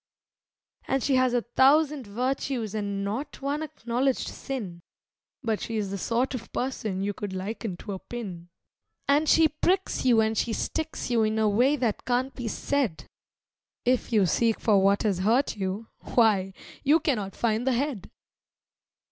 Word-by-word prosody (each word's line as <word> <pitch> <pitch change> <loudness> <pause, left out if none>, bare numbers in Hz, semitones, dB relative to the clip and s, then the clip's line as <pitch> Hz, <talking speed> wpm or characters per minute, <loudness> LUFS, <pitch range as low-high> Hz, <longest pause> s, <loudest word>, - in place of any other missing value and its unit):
And 270 -1 0
she 275 - +1
has 255 -1 +3
a 240 - +1
thousand 280 +1 +3
virtues 245 0 -2
and 200 -2 -2
not 225 +9 -4
one 285 +2 -2
acknowledged 255 -2 -1
sin, 200 -11 -6 0.6
But 220 -2 -1
she 225 - -3
is 200 -2 -2
the 200 - -2
sort 240 +6 0
of 245 -3 -6
person 215 -7 -2
you 205 +1 -1
could 200 -1 -5
liken 195 0 -4
to 205 - -7
a 190 - -4
pin. 185 -8 -7 0.6
And 290 +2 +3
she 325 -1 +6
pricks 360 +5 0
you 245 -3 +5
and 220 0 +2
she 225 +1 0
sticks 315 +1 -3
you 235 -2 +3
in 215 0 +1
a 220 -1 +3
way 245 +8 +3
that 240 -7 -1
can't 255 +2 0
be 245 -3 -5
said. 240 - -1 0.8
If 250 0 +1
you 210 -4 +4
seek 225 +6 +2
for 205 -3 +4
what 200 +1 +3
has 200 -5 +1
hurt 230 +8 +2
you 200 +2 -4
why, 200 -5 +2 0.3
you 300 +4 +5
cannot 215 -11 -1
find 230 +2 0
the 260 - +3
head! 250 -5 -2
230 Hz, 165 wpm, -27 LUFS, 205-265 Hz, 0.8 s, she